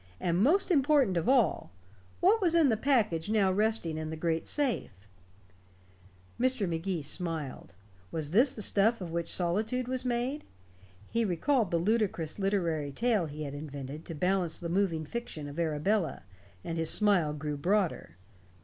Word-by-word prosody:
and 175 0 0
most 350 - +3
important 280 - +3
of 170 +4 0
all, 245 - +2 0.5
what 420 +5 +4
was 340 -3 +2
in 320 -5 +5
the 225 - +3
package 215 - +1
now 205 -3 +3
resting 200 -5 +1
in 155 0 -4
the 160 - -4
great 165 0 -1
safe? 230 - -1 1.3
Mr. 255 -5 +1
Magee 170 0 -2
smiled. 155 - -5 0.4
Was 155 -2 -4
this 245 +8 +3
the 215 - -4
stuff 220 +5 +2
of 175 -4 -6
which 170 0 -2
solitude 215 +8 0
was 255 0 -3
made? 250 +4 -2 0.7
He 230 - +1
recalled 220 - +1
the 170 - +1
ludicrous 190 -3 0
literary 170 -7 0
tale 215 - +1
he 150 +1 -6
had 140 -2 -5
invented 145 0 -7
to 165 - -7
balance 180 +1 0
the 170 - -5
moving 170 -4 0
fiction 155 -7 -5
of 145 +3 -7
Arabella, 165 +1 0 0.4
and 165 0 -4
his 165 -1 +1
smile 195 -8 +3
grew 150 0 -4
broader. 175 - -1
185 Hz, 160 wpm, -30 LUFS, 160-230 Hz, 1.3 s, in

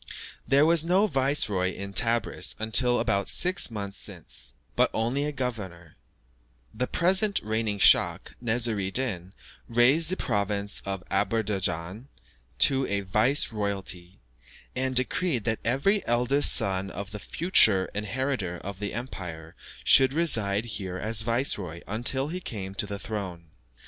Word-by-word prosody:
There 140 +2 +4
was 165 -1 +4
no 185 +5 +2
viceroy 130 - +1
in 100 0 -7
Tebris 115 +3 +1
until 120 +3 +2
about 100 0 -1
six 185 -5 +2
months 100 -3 -5
since, 85 - -4 0.2
but - - +3
only 120 +6 -1
a 150 - -2
governor; 100 - -6 0.8
the 125 - -2
present 190 +4 +2
reigning 110 -1 -2
schach, - - +3
Nesr 115 -2 +1
I 95 - -2
Din, 95 -6 -3 0.4
raised 130 +8 +3
the 185 - -2
province 100 -2 -1
of 95 -2 -4
Aderbeidschan 95 -1 -2 0.5
to 135 -1 +3
a 100 0 -2
vice 110 +10 +1
royalty, 95 -4 -5 0.6
and 130 0 -2
decreed 130 - 0
that 110 0 -1
every 140 - +1
eldest 125 +4 +3
son 95 0 +1
of 100 +2 -7
the 105 - -7
future 110 - +4
inheritor 105 -3 -3
of 100 +1 -8
the 105 0 -5
empire 90 -9 -7 0.3
should 130 0 +5
reside 110 -10 +1
here 95 -5 -5
as 110 +3 0
viceroy 110 - 0
until 125 +6 +1
he 180 +3 -4
came 100 - -6
to 100 - -2
the 100 - -5
throne. 90 -6 -7
110 Hz, 140 wpm, -26 LUFS, 100-130 Hz, 0.8 s, should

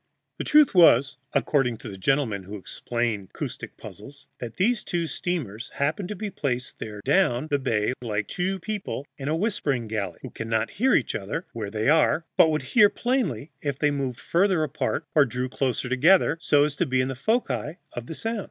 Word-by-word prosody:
The - - -1
truth 300 -2 +5
was, 140 -7 +6 0.2
according 125 -6 +1
to - - -10
the 100 - -7
gentlemen 110 0 0
who 100 +3 -8
explain 115 +1 -3
acoustic - - -6
puzzles, 140 +7 -11
that 120 -2 -6
these 220 +4 +1
two 170 -1 -1
steamers 140 - -4
happened 155 +7 -1
to 210 - -4
be 205 +1 -5
placed 125 -8 -3
there 105 -1 -7
down 150 -3 +2
the 145 - +2
bay 115 -4 0
like 105 -4 -2
two 190 +2 -1
people 190 -6 -4
in 135 - -5
a 155 - +1
whispering 150 - -1
gallery, 100 -5 -3
who - - -7
cannot 115 0 -2
hear 260 +5 +2
each 130 - +1
other 110 - -4
where 110 -3 -4
they 110 +2 -2
are, 160 +2 +3
but 160 - +6
would 155 -3 -1
hear 210 -4 +7
plainly 185 - -1
if 140 -3 -2
they 150 0 +2
moved 135 -4 -3
further 180 -2 +2
apart 150 +1 -2
or 150 - +6
drew 125 0 -2
closer 130 0 -1
together, 150 +7 +4
so 145 -2 +4
as 150 -1 -3
to 175 - +1
be 130 0 +1
in 130 - +2
the 135 - -4
foci 150 - -1 0.2
of 120 +6 -6
sound. 225 0 -2
140 Hz, 195 wpm, -25 LUFS, 120-175 Hz, 0.2 s, hear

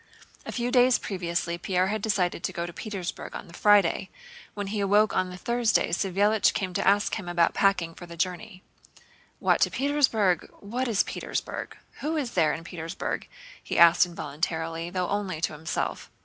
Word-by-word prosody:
A - - -3
few 245 0 -2
days 250 -1 +5
previously 170 -2 -3
Pierre 185 +1 +1
had 215 0 -2
decided 190 -5 0
to - - -1
go 170 - -3
to 175 - -8
Petersburg 195 -5 -6
on - - -6
the 170 - -15
Friday. 200 -2 +3 0.5
When 205 -1 -3
he 205 +2 -3
awoke 205 +2 +3
on 185 0 +1
the 180 - -8
Thursday, 235 +3 +1
Savélich 200 +4 +2
came 185 -3 -2
to - - -1
ask 205 +2 +3
him 180 -4 -7
about 170 -1 +2
packing 180 -4 +2
for 175 - -11
the 170 0 -10
journey. 185 +2 -3 0.7
"What, - - +2
to - - +4
Petersburg? 260 -10 +1
What 245 +6 -3
is 220 -4 +2
Petersburg? - - -5 0.2
Who 315 +2 -2
is 265 -6 -2
there 160 -7 +3
in 160 - -5
Petersburg?" 165 +1 -5 0.4
he - - -3
asked 170 +1 +7
involuntarily, 165 +1 -3
though 180 0 -1
only 195 -5 -2
to 165 - 0
himself. 155 +1 -3
185 Hz, 175 wpm, -27 LUFS, 170-210 Hz, 0.7 s, asked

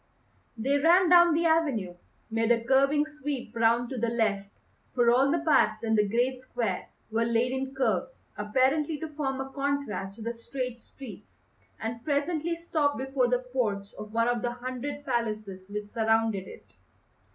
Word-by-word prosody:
They 275 +6 +1
ran 345 +4 +5
down 345 -2 +7
the 335 +1 +1
avenue, 285 - +1 0.4
made 225 +1 +1
a 230 -1 +2
curving 275 +3 +3
sweep 295 -6 -6
round 235 +2 +2
to 260 - -3
the 235 +1 0
left 210 -4 0 0.5
for 240 -2 +4
all 265 +3 +4
the 335 - +2
paths 310 - +3
in 225 -1 0
the 210 -2 +3
great 250 +3 0
square 235 -7 -3 0.2
were 225 +1 +1
laid 235 +2 +1
in 265 +1 -3
curves, 270 - -1
apparently 265 +9 +1
to 320 - -4
form 280 -3 -3
a 270 0 -5
contrast 275 -9 -2
to 225 - -9
the 230 +1 -2
straight 250 +1 -5
streets 265 +3 -13 0.4
and 230 +1 -5
presently 315 +3 0
stopped 315 -4 0
before 265 -1 0
the 250 +1 0
porch 205 -6 -1
of 210 0 -9
one 230 +1 +1
of 240 -1 0
the 240 -1 -2
hundred 255 +4 -5
palaces 215 -6 -3
which 210 0 -4
surrounded 225 -3 +1
it. - - -12
250 Hz, 170 wpm, -28 LUFS, 225-285 Hz, 0.5 s, down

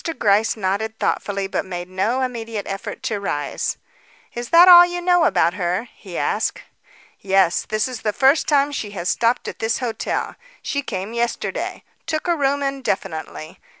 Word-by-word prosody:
Gryce 215 +1 +2
nodded 215 +3 -2
thoughtfully, 200 -1 -1
but 195 - -2
made 175 -2 -6
no 200 +8 -1
immediate 230 -4 -4
effort 195 +5 -6
to 225 -5 -2
rise. 145 -8 -3 0.6
"Is 240 0 -5
that 345 +2 +7
all 350 -1 +11
you 350 0 -2
know 355 -1 +3
about 175 - +2
her?" 185 +5 -2
he 185 -4 -9
asked. - - -1 0.6
"Yes; 190 -3 +2
this 215 +2 0
is 250 -3 -7
the 210 - 0
first 270 +7 +3
time 285 -1 +3
she 225 -7 -4
has 175 - -2
stopped 235 +1 +1
at - - -7
this 225 0 0
hotel. 230 -4 -3 0.3
She 280 - -2
came 195 -4 -5
yesterday. 235 0 -3 0.2
Took 310 +2 -2
a 345 - +2
room 280 -1 0
indefinitely. 190 - -4
220 Hz, 165 wpm, -21 LUFS, 195-270 Hz, 0.6 s, all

